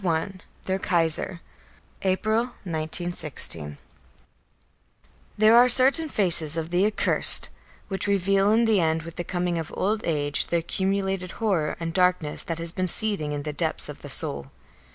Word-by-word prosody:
I 165 Hz, +1 st, -2 dB, 0.3 s
THEIR 190 Hz, 0 st, -3 dB
KAISER 170 Hz, -1 st, +3 dB, 0.6 s
April, 215 Hz, +4 st, -1 dB, 0.2 s
1916. 155 Hz, -, -1 dB, 1.6 s
There 215 Hz, +2 st, +4 dB
are 245 Hz, +1 st, +5 dB
certain 270 Hz, +6 st, +6 dB
faces 170 Hz, -, +3 dB
of 165 Hz, +1 st, -5 dB
the 180 Hz, +3 st, +1 dB
accursed, 215 Hz, -, +4 dB, 0.4 s
which 195 Hz, 0 st, -5 dB
reveal 195 Hz, 0 st, +1 dB
in 230 Hz, +2 st, +2 dB
the 220 Hz, -3 st, +2 dB
end 160 Hz, -1 st, -1 dB
with 165 Hz, 0 st, -11 dB
the 175 Hz, -, -4 dB
coming 175 Hz, -1 st, -3 dB
of 160 Hz, -, -7 dB
old 210 Hz, +3 st, -1 dB
age 145 Hz, -3 st, -2 dB
the 170 Hz, -, -1 dB
accumulated 190 Hz, +1 st, -3 dB
horror 190 Hz, -9 st, -2 dB
and 165 Hz, -1 st, -5 dB
darkness 180 Hz, -5 st, +1 dB
that 165 Hz, -, -4 dB
has 165 Hz, 0 st, -4 dB
been 185 Hz, +1 st, -3 dB
seething 195 Hz, -6 st, -2 dB
in 145 Hz, -1 st, -5 dB
the 150 Hz, 0 st, -6 dB
depths 145 Hz, -, -3 dB
of -, -, -11 dB
the -, -, -10 dB
soul. 70 Hz, -1 st, 0 dB
180 Hz, 155 wpm, -23 LUFS, 160-200 Hz, 1.6 s, certain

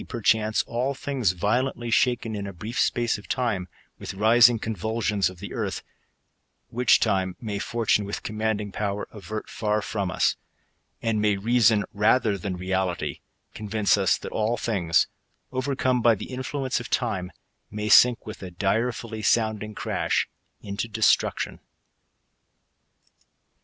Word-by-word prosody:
• 120 Hz, -3 st, -7 dB
chance, 110 Hz, 0 st, +3 dB
all 125 Hz, +4 st, -1 dB
things 130 Hz, -9 st, 0 dB
violently 120 Hz, +5 st, -1 dB
shaken, 120 Hz, -2 st, +2 dB
in 100 Hz, -1 st, -4 dB
a 100 Hz, -, -7 dB
brief 105 Hz, +7 st, -5 dB
space 120 Hz, -3 st, +1 dB
of 105 Hz, -, -14 dB
time, 115 Hz, -8 st, -1 dB, 0.3 s
with -, -, -6 dB
rising 115 Hz, +3 st, +6 dB
convulsions 110 Hz, -1 st, -1 dB
of 95 Hz, -, -12 dB
the 100 Hz, +4 st, -8 dB
earth; -, -, -3 dB, 0.9 s
which 125 Hz, +1 st, +4 dB
time 95 Hz, -1 st, 0 dB
may 105 Hz, -4 st, -4 dB
Fortune, 115 Hz, -1 st, +1 dB
with 100 Hz, 0 st, -5 dB
commanding 110 Hz, -1 st, -2 dB
power, 100 Hz, 0 st, -3 dB
avert 105 Hz, +1 st, -6 dB
far 105 Hz, -1 st, -1 dB
from 100 Hz, -3 st, -3 dB
us; -, -, +1 dB, 0.7 s
and 110 Hz, -2 st, +1 dB
may 105 Hz, -1 st, +2 dB
reason, 110 Hz, 0 st, +3 dB
rather 105 Hz, +1 st, +3 dB
than 95 Hz, -1 st, -4 dB
reality, 95 Hz, -1 st, -2 dB, 0.3 s
convince 105 Hz, -1 st, +1 dB
us 95 Hz, -2 st, +2 dB
that -, -, -8 dB
all 110 Hz, +2 st, 0 dB
things, 95 Hz, -8 st, +2 dB, 0.5 s
overcome 130 Hz, -1 st, 0 dB
bi/ 115 Hz, -1 st, +5 dB
the 105 Hz, -, -8 dB
infltience 130 Hz, 0 st, -2 dB
of 120 Hz, -, -8 dB
time, 95 Hz, -7 st, -1 dB, 0.4 s
may 105 Hz, 0 st, -4 dB
sink 120 Hz, +3 st, +6 dB
with 110 Hz, -, -8 dB
a 95 Hz, -, -6 dB
direfully 110 Hz, +4 st, -1 dB
sounding 110 Hz, -1 st, +1 dB
crash -, -, 0 dB, 0.4 s
into 100 Hz, +3 st, -3 dB
destruction. 110 Hz, 0 st, +1 dB
110 Hz, 140 wpm, -25 LUFS, 100-120 Hz, 0.9 s, rising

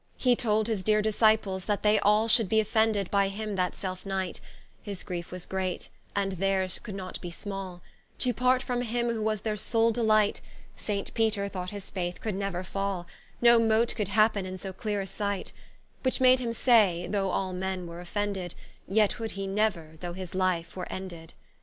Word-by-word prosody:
He 250 Hz, -2 st, +4 dB
told 220 Hz, -2 st, +1 dB
his 215 Hz, -5 st, -1 dB
deere 215 Hz, 0 st, +3 dB
Disciples, 215 Hz, -3 st, +2 dB
that 205 Hz, -2 st, -1 dB
they 210 Hz, 0 st, +5 dB
all 210 Hz, +2 st, +4 dB
Should 225 Hz, -3 st, +5 dB
be 220 Hz, -, +4 dB
offended 220 Hz, -2 st, +1 dB
by 200 Hz, -1 st, +3 dB
him 210 Hz, +1 st, -4 dB
that 180 Hz, -1 st, 0 dB
selfe 185 Hz, -1 st, -5 dB
night; 190 Hz, -2 st, -3 dB, 0.4 s
His 200 Hz, -3 st, -7 dB
Griefe 175 Hz, -2 st, -5 dB
was 180 Hz, -1 st, -7 dB
great, 190 Hz, -1 st, -3 dB, 0.3 s
and 200 Hz, -1 st, +1 dB
theirs 190 Hz, 0 st, +1 dB
could 210 Hz, -4 st, -7 dB
not 185 Hz, -1 st, -6 dB
be 175 Hz, -, -5 dB
small, 190 Hz, -1 st, -6 dB, 0.3 s
To 250 Hz, -1 st, +1 dB
part 255 Hz, +2 st, +2 dB
from 245 Hz, -2 st, -1 dB
him 240 Hz, 0 st, -1 dB
who 225 Hz, -1 st, -2 dB
was 215 Hz, -1 st, 0 dB
their 215 Hz, -1 st, -1 dB
sole 225 Hz, +2 st, +2 dB
Delight; 215 Hz, -2 st, +2 dB, 0.3 s
Saint 200 Hz, -2 st, -3 dB
Peter 220 Hz, -3 st, +1 dB
thought 185 Hz, -2 st, -5 dB
his 200 Hz, -1 st, -7 dB
Faith 180 Hz, -2 st, -3 dB
could 215 Hz, -, -3 dB
neuer 195 Hz, -2 st, -2 dB
fall, 195 Hz, -1 st, -3 dB, 0.4 s
No 235 Hz, -1 st, +8 dB
mote 225 Hz, +1 st, +3 dB
could 210 Hz, -4 st, -1 dB
happen 215 Hz, 0 st, +3 dB
in 185 Hz, 0 st, -5 dB
so 190 Hz, 0 st, -7 dB
clear 210 Hz, 0 st, -2 dB
a -, -, -4 dB
sight: 200 Hz, 0 st, -3 dB, 0.5 s
Which 260 Hz, -, 0 dB
made 255 Hz, 0 st, +6 dB
him 240 Hz, -2 st, -2 dB
say, 215 Hz, -8 st, +4 dB
Though 195 Hz, -2 st, 0 dB
all 185 Hz, 0 st, -1 dB
men 185 Hz, 0 st, -3 dB
were 170 Hz, 0 st, -8 dB
offended, 190 Hz, -1 st, -3 dB, 0.3 s
Yet 210 Hz, +3 st, +2 dB
would 225 Hz, -1 st, -3 dB
he 195 Hz, 0 st, -4 dB
never, 195 Hz, -6 st, -1 dB
though 175 Hz, -1 st, -4 dB
his 185 Hz, -1 st, -7 dB
life 185 Hz, -2 st, 0 dB
were 180 Hz, -1 st, -5 dB
ended. 175 Hz, -4 st, -7 dB
200 Hz, 195 wpm, -28 LUFS, 185-220 Hz, 0.5 s, No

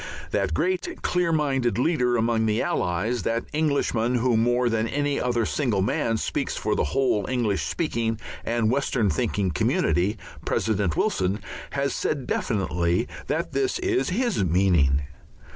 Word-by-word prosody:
That -, -, 0 dB
great, 365 Hz, -1 st, -1 dB
clear 180 Hz, -2 st, +1 dB
minded 135 Hz, -7 st, +1 dB
leader 125 Hz, -3 st, +2 dB
among 115 Hz, -1 st, +1 dB
the 110 Hz, +1 st, +1 dB
Allies, 105 Hz, +8 st, 0 dB
that 115 Hz, +1 st, -1 dB
Englishman 140 Hz, -6 st, +1 dB
who 120 Hz, 0 st, +2 dB
more 120 Hz, +2 st, +2 dB
than 115 Hz, -1 st, +1 dB
any 145 Hz, +2 st, 0 dB
other 120 Hz, -2 st, +1 dB
single 115 Hz, -10 st, 0 dB
man 115 Hz, +3 st, 0 dB
speaks -, -, -2 dB
for -, -, 0 dB
the -, -, +1 dB
whole 105 Hz, -, +1 dB
English 110 Hz, -8 st, 0 dB
speaking 115 Hz, -, -1 dB, 0.2 s
and 115 Hz, -1 st, +1 dB
Western 125 Hz, -6 st, +1 dB
thinking 105 Hz, -6 st, 0 dB
community, 90 Hz, +6 st, +1 dB, 0.3 s
President 100 Hz, -7 st, 0 dB
Wilson, 95 Hz, +3 st, +1 dB, 0.3 s
has 140 Hz, -1 st, 0 dB
said 140 Hz, -4 st, -2 dB
definitely 90 Hz, -1 st, 0 dB, 0.2 s
that -, -, -1 dB
this 395 Hz, -1 st, 0 dB
is 370 Hz, 0 st, 0 dB
his 220 Hz, -, 0 dB
meaning. 85 Hz, -6 st, +3 dB
115 Hz, 145 wpm, -25 LUFS, 100-140 Hz, 0.3 s, meaning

